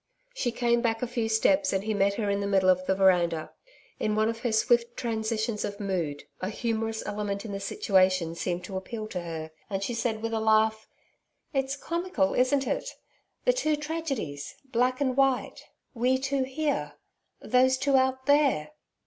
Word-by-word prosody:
She 255 - -1
came 235 0 +1
back 225 -1 0
a - - 0
few 230 -2 -2
steps, 285 +7 +3
and 195 0 0
he 220 +1 -1
met 200 0 +2
her 215 -2 -2
in 200 0 +1
the 200 - -2
middle 190 -2 +4
of 185 0 -1
the 190 - +2
veranda. 175 -4 +2 0.5
In 215 0 0
one 215 +1 +2
of 230 0 -4
her 240 0 -1
swift 235 +2 +2
transitions 220 -1 -1
of 200 +1 -4
mood 175 -8 -2 0.2
a 185 - -2
humorous 225 0 -2
element 205 0 -3
in 215 - -5
the 195 - -3
situation 185 -3 +2
seemed 175 +1 -3
to 190 - -7
appeal 215 +4 -5
to 180 - -4
her, 160 -2 -6 0.2
and 195 -1 -2
she 240 - -2
said 230 -1 -2
with 230 0 -2
a 225 - +1
laugh: 220 0 +2 0.7
'It's 270 0 0
comical, 335 - -1
isn't 265 +2 +2
it? - - -3 0.5
The - - +5
two 310 -12 +1
tragedies, 295 - -4
black 255 0 0
and 260 -3 +1
white 270 -2 +1 0.3
we 250 +2 +2
two 270 0 -1
here 265 - -2 0.5
those 260 +3 +3
two 275 +1 +2
out 260 0 +2
there!' 275 - +3
225 Hz, 180 wpm, -28 LUFS, 195-260 Hz, 0.7 s, The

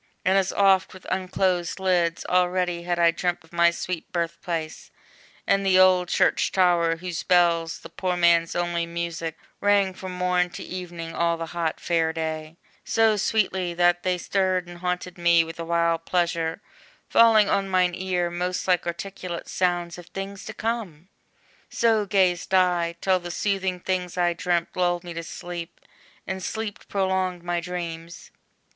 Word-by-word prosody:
and 190 +1 +3
as 195 -1 +2
oft 195 -2 +3
With 185 - -13
unclosed 185 -1 0
lids, 180 -3 +1
already 180 -1 +1
had 175 0 -2
I 170 -1 +5
dreamt 175 +1 -2
Of 165 - -23
my 170 0 +5
sweet 170 0 -5
birth 170 -1 -2
place, 165 -4 -4 0.6
and 195 0 +2
the 190 -1 +4
old 185 -1 +5
church - - +2
tower, 175 -3 +3
Whose 170 0 -5
bells, 170 -2 +2
the 165 - -10
poor 180 +1 -2
man's 170 -1 +3
only 175 -1 -1
music, 170 -1 -4 0.2
rang 200 -2 +3
From 185 0 -7
morn 180 0 +1
to - - -7
evening, 175 -2 -7
all 170 0 +1
the 165 - -4
hot 165 -2 -2
Fair 165 -2 +1
day, 160 0 -4 0.3
So 225 -1 +3
sweetly, 190 -4 0
that 175 0 +3
they 180 0 0
stirred 185 -1 0
and 175 0 -10
haunted 180 0 -3
me 170 -1 +5
With 165 +1 -9
a - - -2
wild 170 0 +1
pleasure, 170 0 -1 0.4
falling 225 -3 +6
on 195 -1 0
mine 180 -1 +2
ear 180 -1 -1
Most 180 +2 -2
like 180 -2 +2
articulate 175 0 -5
sounds 175 -1 -1
of 175 - -12
things 195 +2 -7
to - - -6
come! 205 -7 -4 0.6
So 220 -3 +2
gazed 190 -2 +2
I, 175 -2 +2
till 190 -1 +2
the 175 0 -7
soothing 190 0 -1
things, 180 -1 -3
I 175 -1 +2
dreamt, 170 0 -1
Lulled 175 -1 +1
me 175 -1 -7
to 170 - -4
sleep, 175 0 -7 0.5
and 190 0 -4
sleep 220 +2 -5
prolonged 190 -2 -1
my 175 0 -1
dreams! 170 -1 -6
175 Hz, 165 wpm, -25 LUFS, 170-185 Hz, 0.6 s, falling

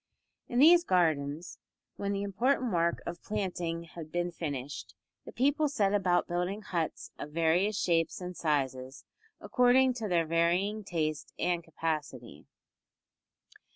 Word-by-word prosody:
In 240 - -3
these 340 +6 +7
gardens, 160 - 0 0.4
when 200 0 -3
the 200 0 -1
important 240 +4 0
work 170 0 +1
of 170 0 -6
planting 175 -5 -3
had 165 -1 -10
been 175 0 -1
finished, 145 -5 -5 0.3
the - - -8
people 285 +4 +2
set 205 -8 +1
about 185 -3 +2
building 180 +4 -2
huts 170 -5 -3
of 145 - -6
various 175 +6 +2
shapes 165 -2 +1
and 180 -1 -6
sizes, 135 -4 -2 0.3
according 255 +1 +4
to 230 -3 -4
their 170 -3 +2
varying 175 +6 +1
taste 155 -5 -3
and 175 -1 0
capacity. 150 - -5
175 Hz, 130 wpm, -30 LUFS, 160-205 Hz, 0.4 s, these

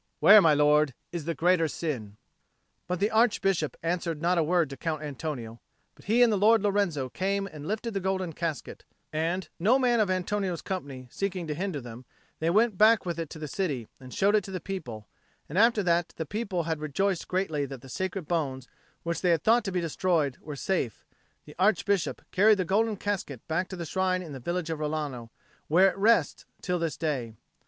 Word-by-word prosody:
Where, 210 +1 +9
my 160 -4 +5
lord, 150 -2 +3 0.2
is 170 -4 -5
the 165 0 -2
greater 170 +2 +3
sin?" 125 -11 -4 0.7
But 180 0 -2
the 205 +2 +1
Archbishop 195 - +2
answered 170 -2 -1
not 175 +2 +2
a - - +3
word 165 -2 +1
to - - -5
Count 155 +1 -3
Antonio; 135 -6 -6 0.3
but - - -20
he 230 +4 +4
and 230 -3 +4
the 200 - +1
Lord 220 +1 +5
Lorenzo 195 -10 +1
came 195 +8 -1
and 155 -5 -9
lifted 220 +3 -3
the 195 - -1
golden 190 -2 -2
casket, 165 -2 -4 0.3
and, 170 +4 -1
no 220 +9 +4
man 245 -3 +2
of 210 -3 +2
Antonio's 185 -1 -1
company 140 -9 -5
seeking 190 -3 -3
to 155 - -3
hinder 175 -1 -3
them, 120 0 -10 0.3
they 160 - +1
went 215 +1 +2
back 220 0 +5
with 170 -2 -3
it 165 -3 -4
to - - -9
the 155 -1 -5
city 140 - -2
and 130 -1 -12
showed 200 +8 +2
it 210 -2 +3
to - - -8
the 185 -1 -4
people; 125 - -6 0.4
and 170 +6 -1
after 225 -2 +4
that 175 -1 +1
the 160 - -3
people 200 -1 -2
had 160 -1 -2
rejoiced 170 +5 -1
greatly 160 -6 -1
that 135 -2 -8
the 135 - -13
sacred 185 +4 -4
bones, 135 -7 -2 0.4
which 170 -1 -2
they 180 - +2
had 165 -3 +2
thought 235 +1 +4
to 195 - -3
be 180 -1 -1
destroyed, 165 -4 0
were 150 -1 -7
safe, 140 - -2 0.4
the 150 - -12
Archbishop 200 -2 +1
carried 210 +2 +5
the 185 - -1
golden 215 +4 +1
casket 185 - -3
back 180 +3 -1
to 190 - -7
the 170 -2 -5
shrine 185 +2 0
in 160 -4 -9
the 135 - -7
village 170 +5 -3
of 160 - -3
Rilano, 150 -6 -3 0.4
where 185 +5 +5
it - - -12
rests 205 -7 +2
till 180 -1 -2
this 165 -2 -2
day. 130 -9 -2
175 Hz, 205 wpm, -28 LUFS, 150-195 Hz, 0.7 s, Where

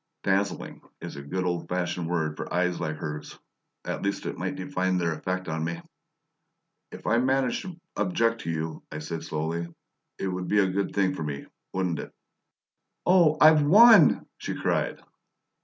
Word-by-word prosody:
"Dazzling" 100 +1 -1 0.2
is - - -7
a 70 - -7
good 90 +7 -3
old 85 -1 -2
fashioned 85 -1 -2
word 80 -3 -1
for - - -6
eyes 90 0 0
like 80 -2 -2
hers; 75 -1 -6 0.5
at - - -3
least 100 0 -2
it - - -3
might - - -3
define 95 0 -1
their 85 -2 0
effect 90 +4 -3
on 80 0 -2
me. 85 +1 -3 1.1
"If - - -11
I 115 - +3
did 125 - +1
manage 130 -2 +1
to 185 -3 -8 0.2
object 115 -10 +1
to - - -5
you," 80 -1 -3
I 75 - -5
said 80 +1 -5
slowly, 80 +2 -3 0.5
"it - - -3
would 90 -1 -3
be 105 - +1
a 100 - +5
good 100 +1 -2
thing 95 -2 +2
for 95 - -6
me 75 -2 -4 0.3
wouldn't 90 -3 -1
it?" - - -7 0.9
"Oh, 175 -4 +5
I've 155 0 +7
WON!" 220 +10 +7
she - - -4
cried. - - -1
90 Hz, 175 wpm, -27 LUFS, 80-115 Hz, 1.1 s, I've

